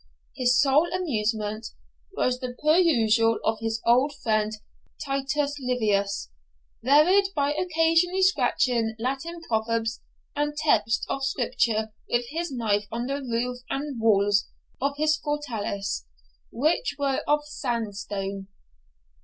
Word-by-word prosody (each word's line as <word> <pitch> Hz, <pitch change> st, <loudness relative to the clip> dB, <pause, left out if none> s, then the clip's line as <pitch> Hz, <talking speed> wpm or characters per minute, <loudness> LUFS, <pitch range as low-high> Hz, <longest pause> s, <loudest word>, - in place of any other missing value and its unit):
His 250 Hz, -1 st, +3 dB
sole 290 Hz, +4 st, +4 dB
amusement 220 Hz, -, -1 dB, 0.5 s
was 250 Hz, 0 st, +1 dB
the 250 Hz, -1 st, -5 dB
perusal 235 Hz, -9 st, +4 dB
of 220 Hz, 0 st, +1 dB
his 225 Hz, 0 st, -2 dB
old 255 Hz, +5 st, +3 dB
friend 215 Hz, -1 st, +1 dB, 0.5 s
Titus 280 Hz, +1 st, -1 dB
Livius, 210 Hz, -, 0 dB, 0.5 s
varied 305 Hz, +10 st, +5 dB
by 285 Hz, 0 st, +1 dB
occasionally 330 Hz, +3 st, +2 dB
scratching 240 Hz, -11 st, +2 dB
Latin 275 Hz, +8 st, -3 dB
proverbs 225 Hz, -2 st, -1 dB, 0.3 s
and 295 Hz, 0 st, -1 dB
texts 225 Hz, -8 st, +2 dB
of 275 Hz, -, -3 dB
Scripture 230 Hz, -4 st, 0 dB, 0.2 s
with 240 Hz, 0 st, +1 dB
his 335 Hz, +1 st, -3 dB
knife 210 Hz, -5 st, 0 dB
on 235 Hz, +2 st, -3 dB
the 275 Hz, +2 st, -3 dB
roof 245 Hz, 0 st, -2 dB
and 275 Hz, -3 st, -3 dB
walls 205 Hz, -2 st, +3 dB, 0.3 s
of 280 Hz, +1 st, 0 dB
his 310 Hz, +1 st, +2 dB
fortalice, 225 Hz, -, -3 dB, 0.4 s
which 310 Hz, -, 0 dB
were 275 Hz, -2 st, 0 dB
of 295 Hz, 0 st, +2 dB
sandstone. 205 Hz, -7 st, -4 dB
250 Hz, 115 wpm, -26 LUFS, 220-295 Hz, 0.5 s, varied